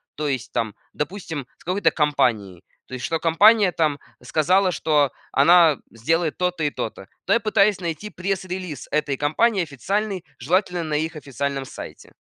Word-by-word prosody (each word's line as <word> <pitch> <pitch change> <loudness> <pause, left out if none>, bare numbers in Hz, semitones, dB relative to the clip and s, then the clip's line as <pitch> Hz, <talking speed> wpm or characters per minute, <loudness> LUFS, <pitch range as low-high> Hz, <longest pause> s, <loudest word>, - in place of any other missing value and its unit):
то 150 0 -2
есть 130 -1 -4
там, 110 -3 -2 0.2
допустим, 160 -3 -4
с - - -21
какой-то 180 -1 +2
компанией. 110 - 0 0.2
То - - -12
есть 125 - -4
что 165 - -1
компания 200 +5 +5
там 155 -4 0 0.2
сказала, 180 +8 +2
что 150 -5 +2 0.2
она 165 +1 +6
сделает 160 +8 0
то-то 180 -3 -1
и 145 - +1
то-то. 100 -6 -6 0.2
То - - +2
я 230 - +4
пытаюсь 210 -3 +2
найти 175 +4 -4
пресс-релиз 185 -6 -4
этой 150 -2 0
компании 190 - +2
официальный, 190 - -3
желательно 180 - 0
на 155 -2 -2
их 160 +2 -1
официальном 140 -1 -4
сайте. - - -10
160 Hz, 155 wpm, -23 LUFS, 140-185 Hz, 0.2 s, она